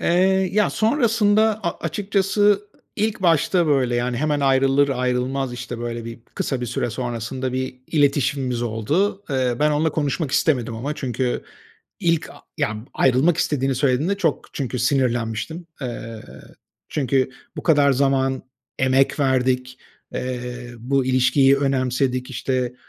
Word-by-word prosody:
Eee, - - 0 0.4
ya, 210 +1 +3
sonrasında 220 -3 +2
a 170 - -2
açıkçası 195 +4 -1
ı 205 -1 +5 0.4
ilk 215 -1 -1
başta, 170 +1 +3
böyle, 135 -5 +2
yani, 120 0 -1
hemen 150 +2 0
ayrılır 135 +1 +3
ayrılmaz, 125 0 -1
işte, 125 0 -6
böyle, 120 -1 -4
bir, 115 0 -8
kısa 135 - -2
bir 125 - -3
süre 120 +1 -2
sonrasında 120 +2 -3
bir 130 0 -3
iletişimimiz 140 -4 +1
oldu. 145 - 0
Eee, 130 -3 +1
ben 150 0 +4
onunla 150 +1 +1
konuşmak 150 0 -1
istemedim 125 -6 +1
ama, 140 +6 -3
çünkü 125 -3 -2 0.6
ilk 165 -4 +1
a - - -13 0.2
yani, 110 0 -1
ayrılmak 135 +6 +3
istediğini 135 -2 0
söylediğinde 140 +8 +1
çok 165 -7 -1
çünkü 130 -2 -3
sinirlenmiştim. 125 +4 -1
Eee, 115 -3 -6 0.7
çünkü 135 -2 0 0.3
bu - - -5
kadar 145 -4 +4
zaman 135 0 +1 0.4
emek 130 +2 +2
verdik, 130 -1 +1 0.4
eee, 125 -1 -5
bu 135 +3 0
ilişkiyi 130 +2 +4
önemsedik. 130 -1 0
İşte, 125 -1 -2
135 Hz, 135 wpm, -22 LUFS, 125-150 Hz, 0.7 s, ı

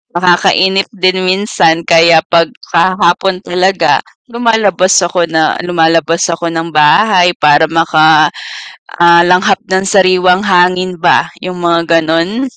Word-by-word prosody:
Nakakainip 185 +2 +1
din 185 -3 -1
minsan 185 -3 -1
kaya 165 -1 +4
'pag 170 -1 0 0.2
sa 185 +2 0
hapon 180 +2 0
talaga, 185 +2 0 0.3
lumalabas 220 -6 -1
ako 175 0 -2
na 160 -1 0
lumalabas 165 0 0
ako 170 0 -5
ng 165 0 -4
bahay 180 +4 +2
para 150 +1 +3
maka 155 -1 +2 0.7
ah, 170 0 +5
langhap 185 +3 +1
ng 190 +1 -1
sariwang 185 -1 +1
hangin 180 -1 0
ba, 175 - +1 0.2
yung 180 -1 -7
mga 170 -1 +1
ganun. 165 +10 -2
175 Hz, 125 wpm, -10 LUFS, 165-185 Hz, 0.7 s, ah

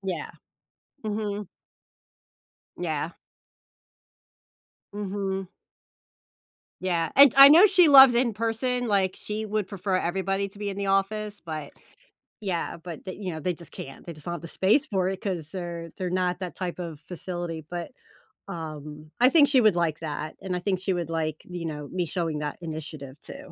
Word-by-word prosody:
Yeah. 190 -2 -4 0.8
Mhm. 210 -1 -3 1.3
Yeah. 160 -2 -2 1.8
Mhm. 195 -2 -3 1.3
Yeah, 170 -3 0
and 280 -2 +9
I 275 0 +12
know 325 +8 +9
she 365 -3 +5
loves 270 -4 +9
in-person, 235 +1 0
like, 195 -3 +2
she 215 +1 -4
would 210 -2 -2
prefer 195 -1 -2
everybody 195 +2 -1
to 200 - -15
be 205 -1 -2
in 195 - -6
the 200 0 -2
office, 205 +2 0
but, 155 -3 -5 0.7
yeah, 185 -5 -2
but 170 -1 -9
they 185 - -5
you 190 -3 -5
know, 160 - -5
they 180 +3 -1
just 170 -1 -14
can't, 135 - -9
they 170 - -5
just 155 -2 -13
don't 175 - -2
have 170 - -7
the 170 - -7
space 215 - +2
for 190 -7 0
it 190 0 -4
'cause 175 -7 -3
they're 170 -2 -6
they're 185 -2 -3
not 180 0 0
that 185 -2 -5
type 180 -2 -4
of 165 -4 -6
facility, 175 -3 -5
but, 175 -1 -5 0.6
um, 155 -2 -7
I 250 +1 +7
think 295 -1 +6
she 265 -2 +4
would 215 -5 +5
like 165 -3 0
that, 155 -1 -5
and 185 -2 -3
I - - -1
think 185 0 -1
she 190 +1 -1
would 170 -2 -3
like, 160 -2 -2
you 175 -2 -6
know, 150 -2 -5
me 180 -1 -1
showing 165 -3 -2
that 150 -1 -4
initiative 155 -4 -7
too, 280 +1 -11
185 Hz, 170 wpm, -26 LUFS, 165-205 Hz, 1.8 s, I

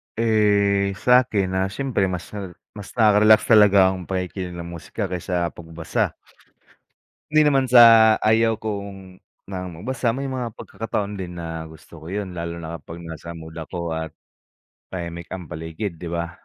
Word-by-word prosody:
Eh, 100 -3 +2
sa'kin, 105 -4 +3
ah, 95 +1 0
siyempre 110 -3 -1
mas 90 -2 -5
na 100 -4 -6 0.2
mas 100 - -9
nakaka-relax 110 -1 +6
talaga 100 -4 +6
ang 95 -2 -5
pakikinig 90 -1 -4
ng 85 -1 -7
musika 90 +4 -5
kaysa 90 -1 -2
pagbasa. 80 -1 -3 1.1
Hindi 155 0 +5
naman 135 -3 +3
sa 115 -3 +8
ayaw 110 +1 +3
kong 100 -3 -7 0.3
na 90 -1 -4
magbasa, 115 +7 -2
may 135 0 -4
mga 125 -4 -4
pagkakataon 105 -2 -4
din 90 -2 -6
na 80 -1 -6
gusto 80 +1 -14
ko - - -10
'yon 100 +1 -4
lalo 85 -1 -5
na 85 0 -7
kapag 85 +1 -10
nasa 85 0 -8
mood 80 -1 -10
ako 85 +1 -5
at 80 -1 -4 0.7
tahimik 85 -2 -6
ang 90 -4 -9
paligid, 80 +3 -5
'di 90 - -8
ba? 85 0 -3
95 Hz, 155 wpm, -22 LUFS, 85-110 Hz, 1.1 s, sa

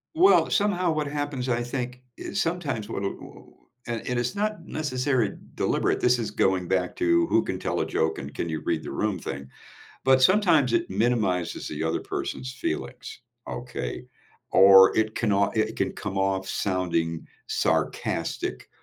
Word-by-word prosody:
well, 375 +4 +5
somehow 185 -4 +2
what 155 -2 -1
happens, 145 -3 -3
I 120 0 +1
think, 125 0 -4 0.2
is 195 - -4
sometimes 150 -11 -2
what 100 - -4
wha 100 - 0
oh, - - -13 0.3
uh, 120 - -2
and 125 -1 0
it's 120 +6 -2
not 210 -3 -2
necessarily 130 -7 -1 0.2
deliberate. - - +1
This 125 0 +3
is 110 -2 -3
going 95 -3 +1
back 90 -1 0
to 85 -1 +3
who - - +3
can - - -4
tell - - -1
a - - 0
joke 80 0 0
and 70 +1 -7
can 85 - -3
you 80 -1 -3
read 80 -2 -1
the - - -6
room 105 -3 -1
thing. 70 -2 -6 0.6
But 130 0 +5
sometimes 180 -1 +4
it 345 0 0
minimizes 110 -7 0
the 75 +1 -4
other 80 - 0
person's 65 -1 -4
feelings, - - -5 0.3
okay? 60 - -5 0.5
Or 95 0 +8
it 110 0 +1
cannot 100 -1 +1
it 110 +1 0
can 95 -1 0
come 95 0 -4
off 95 -1 0
sounding 85 -4 -1 0.2
sarcastic 60 - -1
110 Hz, 165 wpm, -26 LUFS, 90-140 Hz, 0.6 s, Or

